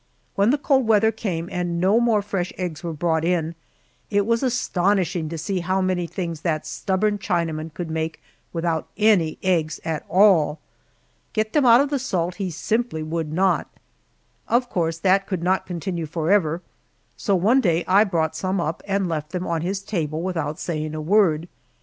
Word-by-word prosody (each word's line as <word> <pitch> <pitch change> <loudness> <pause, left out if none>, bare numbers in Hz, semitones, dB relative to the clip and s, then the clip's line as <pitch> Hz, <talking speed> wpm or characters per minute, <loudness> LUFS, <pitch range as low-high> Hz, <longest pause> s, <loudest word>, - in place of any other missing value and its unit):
When 200 +2 +3
the 280 - +3
cold 270 -4 +2
weather 220 0 +4
came 175 -7 -3
and 175 -2 -2
no 195 +6 +4
more 230 -4 +2
fresh 195 -3 -2
eggs 175 -3 -4
were 170 - -3
brought 160 0 0
in, 170 -1 0 0.6
it 205 -1 +2
was 230 +1 +1
astonishing 190 - 0
to 165 - -5
see 185 +4 -2
how 185 +2 0
many 185 -2 0
things 170 -3 -5
that 155 -3 -1
stubborn 205 +2 -1
Chinaman 165 -3 -2
could 170 -2 -5
make 160 0 -3 0.3
without 165 -2 -1
any 205 -7 +3
eggs 165 -5 +1
at 160 -2 -2
all. 180 -6 +4 0.8
Get 215 0 -1
them 290 -4 +4
out 235 +2 +8
of 285 0 -1
the 285 - +1
salt 180 -8 -2
he 190 - -1
simply 215 0 -1
would 160 -1 -3
not. 185 +3 +1 0.8
Of 245 +1 +1
course 165 -4 0
that 195 +2 +2
could 185 -4 -3
not 185 +2 +1
continue 175 -2 -3
forever, 165 +1 +1 0.5
so 200 - 0
one 220 +9 +4
day 170 -5 +1
I 195 +3 +6
brought 165 -6 -1
some 185 +4 -1
up 165 -1 -2
and 195 -1 0
left 155 -3 -3
them 180 0 -2
on 165 -1 -1
his 190 +3 -2
table 160 -5 -2
without 165 -5 -2
saying 155 -2 -3
a - - -3
word. 170 -1 +2
180 Hz, 180 wpm, -23 LUFS, 165-200 Hz, 0.8 s, out